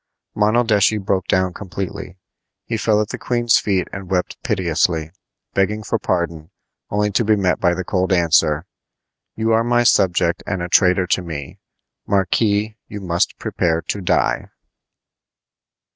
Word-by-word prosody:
Monaldeschi 110 -1 +3
broke 95 -2 -1
down 95 -1 +1
completely. 95 -1 -6 0.5
He 115 - -3
fell 105 -1 +2
at 105 - -3
the - - -5
queen's 120 -2 +2
feet 95 -3 0
and 95 -2 -7
wept 90 -2 -2
piteously, 85 -6 0 0.4
begging 105 +3 0
for 115 +1 -1
pardon, 85 -4 -2 0.4
only 105 0 0
to 105 - +1
be 110 0 +3
met 95 -3 +1
by 85 -1 +2
the 95 - -3
cold 95 +1 -1
answer: 80 -3 +3 0.7
"You 110 +1 0
are 115 +1 +3
my 120 0 +2
subject 85 -6 +2
and 95 -3 -2
a 90 - -4
traitor 90 0 +4
to 90 - 0
me. 80 -6 -7 0.5
Marquis, 105 +2 +1
you 105 - -7
must 85 -3 -1
prepare 85 -1 -1
to 100 - -4
die!" 90 0 0
95 Hz, 145 wpm, -20 LUFS, 90-105 Hz, 0.7 s, traitor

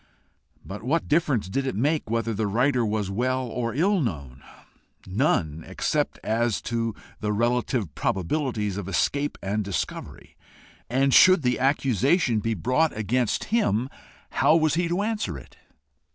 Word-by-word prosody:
But 100 +2 -7
what 150 +8 0
difference 145 - +1
did 135 +8 -2
it 130 - -2
make 145 +3 0
whether 115 0 -1
the 105 0 -1
writer 125 +4 +2
was 105 -3 -1
well 130 +5 0
or 115 -1 -3
ill 190 +5 +2
known? 70 - -4 0.6
None, 85 - 0
except - - -1
as 115 0 0
to 115 -2 -2 0.2
the 105 0 -1
relative 120 - 0
probabilities 105 - -1
of 100 -3 -5
escape 140 +9 0
and 105 +2 -1
discovery! 100 -2 -5 0.5
And 135 +2 +2
should 185 -3 +7
the 125 -1 +1
accusation 135 - +2
be 115 +2 -1
brought 130 - +1
against 115 +2 0
him, 130 - +1 0.4
how 155 - +4
was 155 -2 +3
he 170 +2 +1
to 175 +4 0
answer 215 - -2
it? 65 - -14
120 Hz, 145 wpm, -25 LUFS, 105-140 Hz, 0.6 s, should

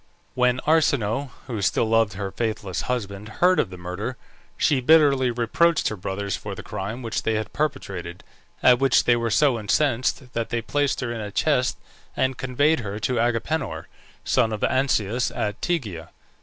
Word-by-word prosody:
When 125 0 +2
Arsinoe, 140 -5 +2 0.2
who 115 -5 -4
still 100 - +2
loved 115 -2 +2
her 95 0 -4
faithless 110 -5 -3
husband, 105 -4 -3
heard 180 +8 +3
of 105 - +1
the 90 - -9
murder, 90 +8 -5 0.4
she 140 -3 +2
bitterly 140 -3 +5
reproached 125 +8 +2
her 110 - -4
brothers 100 +1 -3
for - - -6
the - - -8
crime 110 +7 -5
which 115 - -2
they 110 - 0
had 110 0 -3
perpetrated, 95 - -3 0.4
at 125 -1 +6
which 135 -1 +4
they 120 - +4
were 115 0 -1
so 130 0 +3
incensed, 125 +3 0
that 115 -1 -2
they 120 -1 -2
placed 145 -2 0
her 125 -2 -2
in 115 - -5
a 105 - -5
chest, - - +1 0.4
and 130 0 +1
conveyed 145 +6 +1
her 105 -3 -5
to 120 +2 -1
Agapenor, 120 +7 -1 0.4
son 110 - +2
of 110 - -4
Ancaeus, 125 -3 +1
at 105 -4 -3
Tegea. 105 - -2
120 Hz, 170 wpm, -24 LUFS, 105-130 Hz, 0.4 s, at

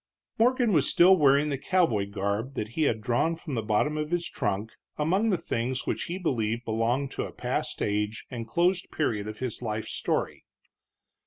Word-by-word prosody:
Morgan 245 -1 +3
was 150 -5 +3
still 185 +2 +7
wearing 145 -2 +4
the 140 -2 -2
cowboy 140 - +1
garb 100 +6 -2
that 105 - -3
he 155 +7 0
had 110 -1 -2
drawn 125 +8 +1
from 165 -3 -7
the 115 - 0
bottom 110 +8 +1
of 150 0 -2
his 175 0 -1
trunk 105 +3 -2 0.3
among 185 +9 +2
the 190 - +2
things 125 -2 -2
which - - -2
he 175 - -4
believed 120 - -1
belonged 115 +5 0
to - - -3
a - - -8
past - - -3
age 105 +1 -1
and 115 -2 -5
closed 175 +7 +1
period 105 -9 -1
of 110 0 -6
his 125 -3 -4
life's 110 -2 -3
story. - - -2
130 Hz, 185 wpm, -27 LUFS, 110-165 Hz, 0.3 s, still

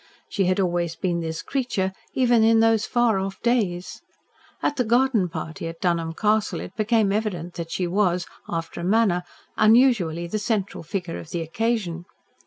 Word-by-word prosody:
She 195 - 0
had 185 +2 +1
always 175 -3 0
been 175 -2 -1
this 160 -1 -4
creature 205 -8 -1 0.2
even 240 -3 +4
in 225 0 +5
those 225 -1 +3
far 240 -4 +2
off 195 0 -4
days. 205 -7 0 0.6
At 290 - 0
the 250 - +2
garden 235 -4 +2
party 160 0 -5
at 165 0 -7
Dunholm 170 -2 0
Castle 215 +1 +1
it - - -9
became 215 -1 +2
evident 190 -5 -2
that 170 -1 -6
she 180 - -1
was, 180 -1 +1 0.2
after 165 0 -4
a - - -5
manner, 195 -2 +3 0.4
unusually 215 -8 +4
the 215 +5 -3
central 210 -3 -2
figure 175 0 -4
of 160 - -10
the 170 - -3
occasion. 175 -1 -2
195 Hz, 170 wpm, -24 LUFS, 170-225 Hz, 0.6 s, in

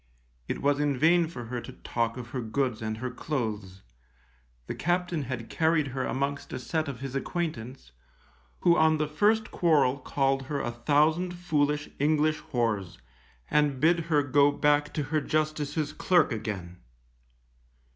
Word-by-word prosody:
It - - -4
was 145 0 +2
in 145 -2 +1
vain 170 +3 +4
for 125 -7 -7
her 120 +1 -4
to - - -10
talk 115 0 -2
of 120 -2 -7
her 130 0 -3
goods 115 0 -1
and 110 0 -3
her 125 +2 -4
clothes; 110 -9 -4 0.8
the - - -4
captain 175 -2 -1
had 125 -2 -5
carried 160 -3 +1
her 130 0 -3
amongst 140 +1 -2
a - - -2
set 155 +5 -2
of 130 -4 -6
his 135 -1 -5
acquaintance, 135 - -4 0.7
who 170 -1 +5
on 160 -1 +4
the 155 0 0
first 210 +9 +2
quarrel 145 -6 +3
called 135 0 0
her 145 -1 -2
a 120 - -2
thousand 155 +8 +2
foolish 150 -4 0
English 155 +1 +2
whores, 110 -7 -1 0.5
and 150 -3 +2
bid 170 +4 +4
her 150 -3 +3
go 145 +1 +4
back 145 0 +2
to 150 - 0
her 155 +2 0
Justice's 155 0 -1
clerk 175 -6 +3
again. 100 -6 -5
145 Hz, 155 wpm, -28 LUFS, 125-155 Hz, 0.8 s, who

